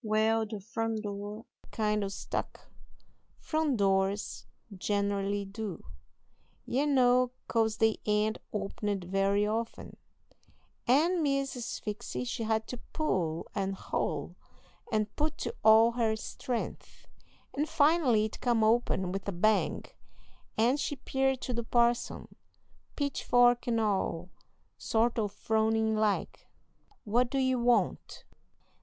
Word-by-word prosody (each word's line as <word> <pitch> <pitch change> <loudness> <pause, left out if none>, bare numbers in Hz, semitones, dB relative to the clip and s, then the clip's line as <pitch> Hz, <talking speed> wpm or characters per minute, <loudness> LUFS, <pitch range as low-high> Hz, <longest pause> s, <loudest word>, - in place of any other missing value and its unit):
Wal, 220 +1 +2
the 215 -1 -6
front 225 +1 -3
door 205 +1 -6 0.3
kind 210 -1 0
o' - - -1
stuck 195 - -5 0.7
front 310 -5 0
doors 195 0 0 0.3
generally 200 +1 -1
do, 200 -1 -6 0.8
ye 275 +4 0
know, 255 -2 +4 0.2
'cause 220 -2 +1
they 220 -1 +2
ain't 210 +1 +1
opened 200 -1 -3
very 195 +3 +1
often 225 +2 -3 0.9
and 325 +8 +3
Miss 275 -2 +1
Sphyxy 230 -2 -5
she 245 -1 -4
had 220 0 0
to 250 - -5 0.2
pull 175 - -1
and 195 -1 -1
haul - - -3 0.6
and 215 -2 0
put 305 +1 -1
to - - -4
all 220 +1 +7
her 230 -2 +1
strength, 235 +2 -5 0.5
and 300 +3 -1
finally 295 -8 +3
it 215 - -7
come 235 -3 +2
open 215 -5 +2
with 195 +1 -4
a - - 0
bang, 205 +4 +1 0.7
and 240 +6 +3
she 290 - -2
'peared 265 0 0
to 250 - -3
the 235 0 -2
parson, 235 +1 +1 0.7
pitchfork 245 -4 +2
and 230 -1 +1
all, 190 -4 -1 0.5
sort 230 +1 +1
o' 210 - +1
frownin' 220 +1 +1
like. 215 -2 -1 0.6
"'What 240 +3 +2
do 275 - -2
you 260 -1 +2
want?' 240 0 0
220 Hz, 125 wpm, -30 LUFS, 205-245 Hz, 0.9 s, all